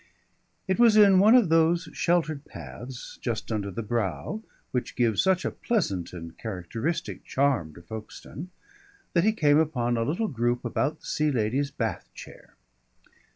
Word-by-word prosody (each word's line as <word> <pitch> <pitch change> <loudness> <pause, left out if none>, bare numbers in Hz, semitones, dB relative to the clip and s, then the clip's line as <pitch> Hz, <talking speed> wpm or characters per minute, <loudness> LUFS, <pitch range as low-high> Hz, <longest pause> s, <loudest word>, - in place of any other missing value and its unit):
It 190 +4 0
was 230 -3 +6
in 200 -3 +7
one 215 +5 +7
of 235 -9 +5
those 165 +2 +3
sheltered 160 -4 0
paths 100 - -9
just 115 -1 -3
under 105 -2 -2
the 115 +4 -5
brow 105 - -2 0.3
which 125 - -3
give 115 -4 +1
such 190 -1 +2
a - - 0
pleasant 100 - -1
and 85 -2 -9
characteristic 115 - -4
charm 130 - 0
to 85 - -13
Folkestone, 110 - -8 0.6
that 170 - +3
he 215 - +4
came 150 -8 +4
upon 125 -7 0
a 115 - +1
little 175 - -1
group 120 - -1
about 150 +4 -1
the - - -15
Sea 150 0 0
Lady's 130 +2 0
bath 140 - -3
chair. - - -13
135 Hz, 155 wpm, -27 LUFS, 110-170 Hz, 0.6 s, in